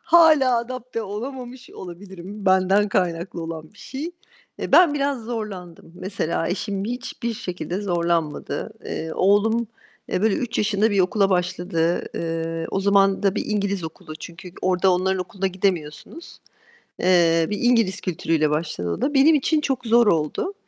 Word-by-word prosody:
Hâlâ 310 Hz, -7 st, +6 dB
adapte 245 Hz, -1 st, -5 dB
olamamış 245 Hz, +4 st, -7 dB
olabilirim. 190 Hz, +2 st, -9 dB
Benden 190 Hz, +2 st, +4 dB
kaynaklı 175 Hz, -2 st, -1 dB
olan 160 Hz, 0 st, -7 dB
bir 205 Hz, -, -22 dB
şey. 290 Hz, +6 st, -6 dB, 0.5 s
Eee, -, -, -5 dB
ben 345 Hz, -5 st, +7 dB
biraz 280 Hz, -3 st, -1 dB
zorlandım, 195 Hz, -8 st, -6 dB
mesela. 175 Hz, -3 st, -2 dB
Eşim 195 Hz, +1 st, -2 dB
hiçbir 235 Hz, 0 st, -4 dB
şekilde 180 Hz, -3 st, -4 dB
zorlanmadı. 170 Hz, -5 st, -1 dB
Eee, 160 Hz, 0 st, -4 dB
oğlum, 220 Hz, +4 st, +3 dB, 0.4 s
eee, 185 Hz, -, -1 dB
böyle, 220 Hz, -2 st, +3 dB
3 240 Hz, -2 st, -2 dB
yaşında 210 Hz, +1 st, +2 dB
bir 200 Hz, -, +2 dB
okula 195 Hz, +2 st, +2 dB
başladı. 175 Hz, -2 st, 0 dB
Eee, 165 Hz, 0 st, -3 dB
o 195 Hz, -, 0 dB
zaman 195 Hz, 0 st, +3 dB
da 195 Hz, 0 st, +2 dB
bir -, -, -2 dB
İngiliz 200 Hz, -4 st, -1 dB
okulu. 155 Hz, -1 st, -8 dB
Çünkü 170 Hz, +2 st, -10 dB
orada 185 Hz, 0 st, +3 dB
onların 190 Hz, +1 st, +1 dB
okuluna 195 Hz, +1 st, -3 dB
gidemiyorsunuz. 185 Hz, -, -3 dB, 0.6 s
Eee, 165 Hz, -3 st, +4 dB
bir 210 Hz, -, -2 dB
İngiliz 230 Hz, -6 st, +2 dB
kültürüyle 165 Hz, -3 st, 0 dB
başladı 150 Hz, -, -2 dB
o -, -, -4 dB
da. 295 Hz, -, 0 dB
Benim 295 Hz, +3 st, +6 dB
için 300 Hz, +2 st, +2 dB
çok 270 Hz, -4 st, -2 dB
zor 230 Hz, 0 st, +5 dB
oldu. 165 Hz, -, 0 dB
195 Hz, 150 wpm, -23 LUFS, 175-230 Hz, 0.6 s, ben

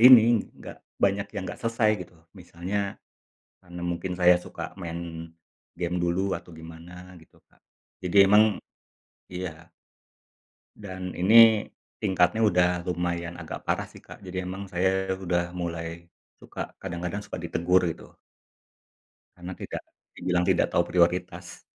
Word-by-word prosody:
ini, 120 Hz, -2 st, +8 dB
nggak -, -, -10 dB, 0.2 s
banyak 100 Hz, 0 st, +1 dB
yang 95 Hz, -, -3 dB
nggak 90 Hz, -, -7 dB
selesai, 115 Hz, -2 st, +2 dB
gitu. 90 Hz, -1 st, -10 dB, 0.2 s
Misalnya, 95 Hz, +2 st, -4 dB, 0.7 s
karena 90 Hz, 0 st, -9 dB
mungkin 85 Hz, +1 st, -2 dB
saya 90 Hz, 0 st, +5 dB
suka 90 Hz, -, -8 dB
main 85 Hz, -2 st, -6 dB, 0.4 s
game 90 Hz, 0 st, -3 dB
dulu, 90 Hz, +3 st, 0 dB
atau 90 Hz, -, -13 dB
gimana, 85 Hz, +3 st, -11 dB
gitu, 80 Hz, -, -19 dB
Kak. -, -, -30 dB, 0.4 s
Jadi 90 Hz, +2 st, -2 dB
emang 105 Hz, +1 st, +5 dB, 0.7 s
iya. 90 Hz, -3 st, -7 dB, 1.1 s
Dan, 95 Hz, -3 st, -7 dB
ini 110 Hz, +3 st, +7 dB, 0.4 s
tingkatnya 95 Hz, +2 st, +3 dB
udah 90 Hz, -4 st, +4 dB, 0.2 s
lumayan 85 Hz, -1 st, -2 dB
agak -, -, -7 dB
parah -, -, -1 dB
sih, -, -, -15 dB
Kak, -, -, -12 dB
jadi 95 Hz, -1 st, -5 dB
memang 95 Hz, +2 st, -6 dB
saya 95 Hz, +1 st, 0 dB
sudah 85 Hz, -2 st, -1 dB
mulai 85 Hz, -1 st, -5 dB, 0.3 s
suka -, -, -7 dB
kadang-kadang 90 Hz, +2 st, -4 dB
suka -, -, -6 dB
ditegur, 85 Hz, +2 st, +2 dB
gitu. 80 Hz, -, -8 dB, 1.2 s
Karena, 90 Hz, +1 st, -7 dB
tidak -, -, -6 dB, 0.3 s
dibilang 90 Hz, -1 st, 0 dB
tidak -, -, +3 dB
tahu -, -, +4 dB
prioritas. 90 Hz, +1 st, 0 dB
90 Hz, 130 wpm, -26 LUFS, 85-95 Hz, 1.2 s, ini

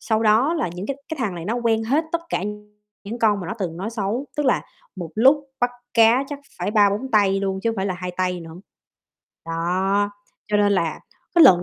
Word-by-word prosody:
Sau 220 Hz, -1 st, 0 dB
đó 230 Hz, +9 st, +4 dB
là 315 Hz, -, -1 dB
những 185 Hz, +3 st, -5 dB
cái 275 Hz, -, -3 dB
cái 320 Hz, -3 st, -5 dB
thằng 200 Hz, -6 st, -1 dB
này 170 Hz, -, -6 dB
nó 220 Hz, +6 st, -1 dB
quen 230 Hz, -2 st, +1 dB
hết 290 Hz, +8 st, +1 dB
tất 335 Hz, -, +1 dB
cả -, -, 0 dB, 0.6 s
những 230 Hz, +4 st, -5 dB
con 210 Hz, -3 st, +3 dB
mà 175 Hz, -, -6 dB
nó -, -, -2 dB
từng 170 Hz, -5 st, -3 dB
nói 200 Hz, +5 st, -4 dB
xấu, 225 Hz, +4 st, -2 dB
tức 295 Hz, -2 st, 0 dB
là 255 Hz, -, +3 dB, 0.3 s
một 170 Hz, -3 st, -6 dB
lúc 270 Hz, +6 st, +5 dB, 0.2 s
bắt 245 Hz, 0 st, +2 dB, 0.2 s
cá 230 Hz, +4 st, +5 dB
chắc 290 Hz, -1 st, -5 dB, 0.2 s
phải -, -, -1 dB
3-4 210 Hz, +4 st, +2 dB
tay 195 Hz, -2 st, +3 dB
luôn 190 Hz, -1 st, -2 dB
chứ 230 Hz, -, +2 dB
hông 225 Hz, -, -5 dB
phải 190 Hz, -, -1 dB
là 190 Hz, -, -1 dB
2 180 Hz, 0 st, -5 dB
tay 180 Hz, -1 st, -1 dB
nữa. 165 Hz, -1 st, -10 dB, 0.9 s
Đó, 190 Hz, +5 st, 0 dB, 0.4 s
cho 210 Hz, -, +2 dB
nên 205 Hz, 0 st, +3 dB
là 165 Hz, -5 st, 0 dB, 0.4 s
cái 335 Hz, -, +9 dB
lần 180 Hz, -1 st, +7 dB
205 Hz, 225 wpm, -22 LUFS, 185-240 Hz, 0.9 s, cái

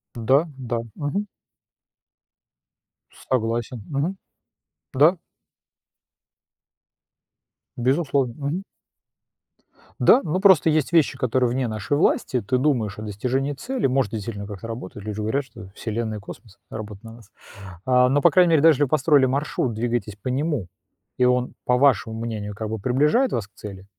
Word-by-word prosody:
Да 130 Hz, +8 st, +3 dB
да. 120 Hz, -2 st, -3 dB, 0.2 s
Мгм. 145 Hz, +8 st, -2 dB, 1.9 s
Согласен. 120 Hz, -1 st, -2 dB
Мгм. 155 Hz, +7 st, -2 dB, 0.8 s
Да. 160 Hz, +7 st, +5 dB, 2.6 s
Безусловно. 135 Hz, -1 st, +1 dB
Мгм. 175 Hz, +7 st, -2 dB, 1.4 s
Да, 265 Hz, -, +6 dB
но 160 Hz, +4 st, -1 dB
просто 190 Hz, -6 st, +5 dB
есть 155 Hz, +1 st, +1 dB
вещи, 165 Hz, -3 st, +3 dB
которые 125 Hz, 0 st, +1 dB
вне 125 Hz, 0 st, -1 dB
нашей 110 Hz, +6 st, -2 dB
власти. 125 Hz, -4 st, +1 dB
Ты 125 Hz, +5 st, 0 dB
думаешь 125 Hz, -8 st, 0 dB
о -, -, -6 dB
достижении 125 Hz, +7 st, -2 dB
цели, 245 Hz, -, -2 dB
может, 130 Hz, -5 st, +1 dB
это 110 Hz, -, -3 dB
действительно 100 Hz, -1 st, -6 dB
как-то 105 Hz, +2 st, -8 dB
работает. 105 Hz, -3 st, -8 dB
Люди 105 Hz, -1 st, -5 dB
говорят, 110 Hz, +7 st, -1 dB
что 110 Hz, -7 st, -12 dB
Вселенная 110 Hz, -1 st, -3 dB
и 105 Hz, -, -9 dB
космос 100 Hz, 0 st, -12 dB
работают 105 Hz, -1 st, -8 dB
на 115 Hz, 0 st, -10 dB
нас, 115 Hz, -3 st, -17 dB, 0.5 s
а. 125 Hz, 0 st, +4 dB
Но, 145 Hz, +1 st, +2 dB
по -, -, +6 dB
крайней 180 Hz, -2 st, +4 dB
мере, 155 Hz, -, +4 dB
даже 160 Hz, 0 st, +7 dB
если 145 Hz, -, +1 dB
вы 140 Hz, -, 0 dB
построили 145 Hz, -1 st, +4 dB
маршрут, 130 Hz, -2 st, -1 dB
двигаетесь 115 Hz, -3 st, -2 dB
по 105 Hz, -, -9 dB
нему 135 Hz, -, -1 dB, 0.5 s
и 125 Hz, -, +3 dB
он, 125 Hz, 0 st, +1 dB
по 125 Hz, 0 st, +3 dB
вашему 115 Hz, -4 st, +2 dB
мнению, 105 Hz, -3 st, -5 dB
как 110 Hz, 0 st, -5 dB
бы 110 Hz, -1 st, -3 dB
приближает 150 Hz, -, +2 dB
вас 110 Hz, -4 st, -2 dB
к -, -, -46 dB
цели. 100 Hz, -2 st, -10 dB
125 Hz, 150 wpm, -23 LUFS, 110-145 Hz, 2.6 s, даже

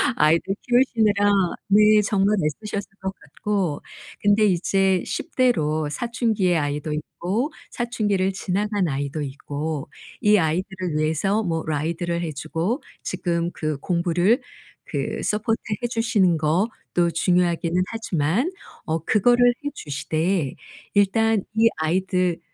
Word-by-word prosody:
아이들 165 Hz, +5 st, +3 dB
키우시느라 220 Hz, -5 st, +3 dB, 0.4 s
네 210 Hz, +1 st, +6 dB
정말 205 Hz, 0 st, +2 dB
애쓰셨을 205 Hz, +6 st, -3 dB
것 190 Hz, 0 st, -3 dB
같고 175 Hz, +1 st, -3 dB, 0.4 s
근데 210 Hz, +1 st, +4 dB
이제 190 Hz, 0 st, +2 dB
10 -, -, -5 dB
대로 155 Hz, -, +2 dB
사춘기의 220 Hz, -4 st, 0 dB
아이도 145 Hz, 0 st, -2 dB
있고 190 Hz, -, -2 dB, 0.2 s
사춘기를 205 Hz, -5 st, 0 dB
지나간 200 Hz, 0 st, -1 dB
아이도 140 Hz, +2 st, -3 dB
있고 145 Hz, +2 st, -4 dB, 0.3 s
이 210 Hz, 0 st, +5 dB
아이들을 180 Hz, 0 st, -1 dB
위해서 160 Hz, +8 st, +1 dB
뭐 165 Hz, -3 st, -1 dB
ride를 170 Hz, +3 st, -1 dB
해 165 Hz, -2 st, -3 dB
주고 165 Hz, -, -2 dB, 0.2 s
지금 170 Hz, -1 st, -1 dB
그 155 Hz, -2 st, -2 dB
공부를 175 Hz, -, +1 dB, 0.4 s
그 -, -, -3 dB
서포트해 220 Hz, +2 st, -1 dB
주시는 210 Hz, -7 st, +2 dB
것도 170 Hz, +1 st, 0 dB
중요하기는 175 Hz, 0 st, +1 dB
하지만 225 Hz, -, 0 dB, 0.3 s
어 160 Hz, 0 st, -1 dB
그거를 245 Hz, +5 st, +4 dB
해 -, -, +1 dB
주시되 155 Hz, -, -1 dB, 0.4 s
일단 210 Hz, +1 st, +3 dB
이 225 Hz, +1 st, +5 dB
아이들을 180 Hz, +2 st, 0 dB
185 Hz, 270 characters per minute, -23 LUFS, 160-210 Hz, 0.4 s, 네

